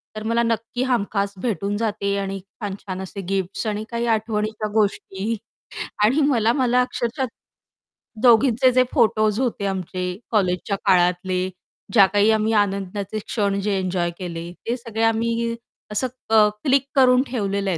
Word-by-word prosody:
तर 215 - -5
मला 230 +1 +1
नक्की 230 +2 -1
हमखास 200 -5 0
भेटून 205 -2 -1
जाते 205 -3 -1
आणि 195 0 -3
छान-छान 195 -1 -7
असे 195 +1 -6
गिफ्ट्स 195 +2 -2
आणि 215 0 -2
काही 235 0 -1
आठवणीच्या 215 0 -2
गोष्टी 210 0 0 0.7
आणि 270 +8 +3
मला 230 -3 +3
मला 250 -2 +3
अक्षरशः 250 +1 -2 1.0
दोघींचे 250 +1 +5
जे 255 0 +5
फोटोज् 215 -4 +3
होते 235 -5 -1
आमचे 185 -1 -3 0.3
कॉलेजच्या 195 -1 +1
काळातले, 180 +1 +2 0.4
ज्या 200 -4 +8
काही 205 +3 +3
आम्ही 220 0 +1
आनंदाचे 200 +1 -4
क्षण 200 -2 -1
जे 200 -1 0
एन्जॉय 180 -2 -1
केले, 170 -2 -5 0.2
ते 240 +2 0
सगळे 230 -2 -4
आम्ही 230 +1 -1 0.4
असं 210 +5 0 0.2
अ, 220 -1 +6 0.2
क्लिक 275 -1 +3
करून 255 -1 +6
ठेवलेलं 200 -5 -1
आहे 170 - -1
215 Hz, 140 wpm, -22 LUFS, 195-230 Hz, 1.0 s, ज्या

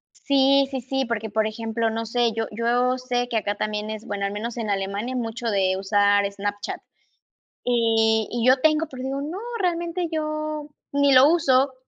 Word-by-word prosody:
Sí, 275 0 +3
sí, 265 - -2
sí, 270 +2 -2
porque, 225 -2 -3
por 215 +1 +1
ejemplo, 225 +1 -2
no 225 +1 -3
sé, 235 +1 +1
yo 225 0 -1
yo 240 +3 +1
sé 245 -1 -1
que 235 - -3
acá 205 -1 -1
también 210 0 -3
es, 220 0 -6
bueno, 200 -1 -3
al - - -5
menos 225 +4 -5
en 225 -3 -3
Alemania 200 +5 -2
mucho 235 -1 -3
de 190 -3 +2
usar 200 0 +2
Snapchat, 205 +1 -4 0.8
y 225 -2 +2
y 240 0 -1
yo 260 +1 +6
tengo, 310 +1 +3
pero 255 -3 -8
digo: 270 +1 -3
"No, 315 +7 -5 0.2
realmente 345 0 -1
yo 305 -1 -3 0.2
ni 285 0 +3
lo 260 +2 +8
uso". 275 -5 +3
235 Hz, 180 wpm, -24 LUFS, 215-270 Hz, 0.8 s, lo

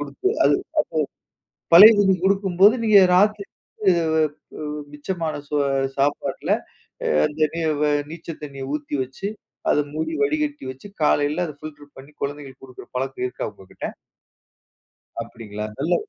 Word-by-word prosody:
குடுத்து 145 - -2 0.2
அது - - +5 1.0
அப்போ - - -33
பழைய 200 +7 +11
தண்ணி 195 -2 +4
குடுக்கும்போது 195 +1 +4
நீங்க 215 -2 +7 0.2
ராத்திரி 205 +1 +3
வந்து 195 -3 -1 0.2
வ - - +2 0.5
உ - - -4 0.3
மிச்சமான 160 +2 -3
சோ 150 - -2 0.4
சாப்பாட்டில 140 +1 0 0.7
அந்த 150 +1 -7
நீ 170 - -3 0.2
வ - - +4 0.3
நீச்ச 165 +1 -10
தண்ணிய 140 -2 -7
ஊத்தி 150 0 -4
வச்சு, 130 +9 -6 0.4
அத - - +3 0.2
மூடி 160 +1 -2
வடிகட்டி 150 0 -1
வச்சு, 130 +8 -11 0.2
காலையில 150 +3 +2
அத 150 - -8
ஃபில்டர் 145 -2 -11
பண்ணி, 135 +2 -12
குழந்தைகளுக்கு 140 -2 -6
குடுக்கிற 130 -2 -12
பழக்கம் 135 0 -3
இருக்கா 125 - -4
உங்ககிட்ட? 95 -2 -9 1.4
அப்படிங்களா! 110 -2 -7
நல்ல 160 +6 +1
150 Hz, 135 wpm, -22 LUFS, 140-180 Hz, 1.4 s, பழைய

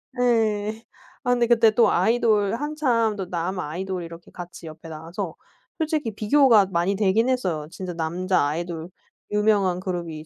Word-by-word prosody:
네. 220 -3 0 0.4
아 245 - +1
근데 240 -1 +2
그때 230 -2 +5
또 230 +2 +4
아이돌 220 -3 +2
한참 255 -7 0
또 190 -3 -5
남 180 +2 -2
아이돌 180 +3 -4
이렇게 170 0 -11
같이 175 -2 -9
옆에 160 +1 -11
나와서 165 +3 -6 0.4
솔직히 305 -7 -1
비교가 220 -2 +4
많이 185 +2 0
되긴 215 +5 +2
했어요. 175 -12 -1
진짜 185 -2 -6
남자 175 +2 0
아이돌 165 +2 -4 0.4
유명한 205 -4 +2
그룹이 170 -4 -5
195 Hz, 310 characters per minute, -24 LUFS, 170-225 Hz, 0.4 s, 그때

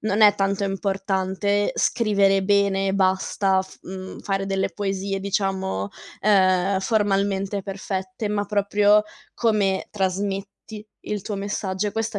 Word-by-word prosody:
non 215 0 +1
è 210 -1 +8
tanto 200 0 0
importante 195 +1 0
scrivere 200 -4 +2
bene 200 -1 +2
e 190 - 0
basta, 190 0 +2
f 190 - -10
mhmm, 190 0 -8
fare 195 -1 -2
delle 195 -1 0
poesie, 195 +1 -3
diciamo, 190 - -1 0.3
ehm, 190 -1 +3
formalmente 200 -1 0
perfette, 190 +1 -4
ma 205 -1 -1
proprio 205 0 +3 0.3
come 205 -4 +1
trasmetti 200 +2 -3
il 210 -1 -4
tuo 205 +2 -5
messaggio. 200 0 -2
E - - -7
questa, 225 -1 -2
195 Hz, 130 wpm, -23 LUFS, 190-205 Hz, 0.3 s, è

